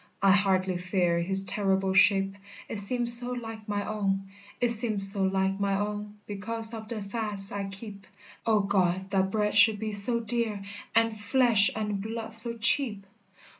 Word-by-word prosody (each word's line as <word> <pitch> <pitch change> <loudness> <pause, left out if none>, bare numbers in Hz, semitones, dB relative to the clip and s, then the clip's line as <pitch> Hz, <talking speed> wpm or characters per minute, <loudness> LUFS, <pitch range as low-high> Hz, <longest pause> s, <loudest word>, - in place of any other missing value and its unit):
I 195 - +5
hardly 190 -2 +1
fear 180 -1 -1
his 190 +3 +1
terrible 195 -1 -1
shape, 195 0 +4 0.3
It - - -5
seems 240 +4 +3
so 245 0 -5
like 225 -3 -8
my 205 -1 -3
own, 195 -2 -3 0.3
It 245 - +1
seems 215 -4 +4
so 200 -1 -4
like 190 0 -1
my 200 -1 0
own 210 0 -5
Because 225 +3 -1
of 220 -1 -8
the 220 -3 -6
fasts 205 -1 -1
I 200 -1 -4
keep; 200 0 -10 0.4
O 215 -2 +3
God! 190 -1 -1
that 190 -1 0
bread 210 0 -1
should 215 0 +5
be 215 +1 -5
so 210 +4 0
dear, 225 -3 -2 0.3
And 225 -1 +2
flesh 225 -1 +2
and 210 -2 -3
blood 225 +1 -5
so 230 +1 +3
cheap! 220 -3 +2
205 Hz, 170 wpm, -27 LUFS, 195-225 Hz, 0.4 s, I